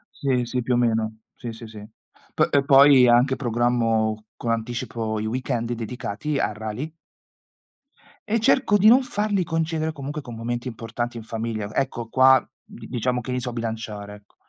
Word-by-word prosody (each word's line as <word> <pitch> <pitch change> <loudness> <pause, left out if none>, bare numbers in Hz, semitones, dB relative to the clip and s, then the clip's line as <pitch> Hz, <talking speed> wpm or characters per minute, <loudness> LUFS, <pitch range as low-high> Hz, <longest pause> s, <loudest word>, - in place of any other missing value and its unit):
Sì, 125 -3 0
sì, 125 +1 -2
più 125 +1 0
o - - +2
meno. 110 -2 0 0.2
Sì, 120 - -7
sì, 115 +1 -10
sì. 105 -2 -10 0.5
Po - - +3 0.2
poi 135 -2 +7
anche 120 +3 +4
programmo 115 -3 0
con 115 - -2
anticipo 115 -1 -3
i 110 - -3
weekend 120 0 -2
dedicati 120 +5 -4
a 105 - 0
rally 110 +9 -5 1.4
e 225 +2 +2
cerco 225 -1 +3
di 205 - +4
non 250 +4 +7
farli 205 -5 -1
coincidere 160 -1 -1
comunque 145 +1 -6
con 120 -4 -9
momenti 120 +2 -3
importanti 120 +1 -5
in 115 - -7
famiglia. 110 -2 -4
Ecco, 125 -4 -2
qua 130 +3 +5 0.2
di - - -12
diciamo 125 0 -1
che 125 +1 -5
li 125 - -1
so 125 - -4
bilanciare, 110 -3 -5
ecco. 105 0 -20
120 Hz, 165 wpm, -23 LUFS, 115-135 Hz, 1.4 s, poi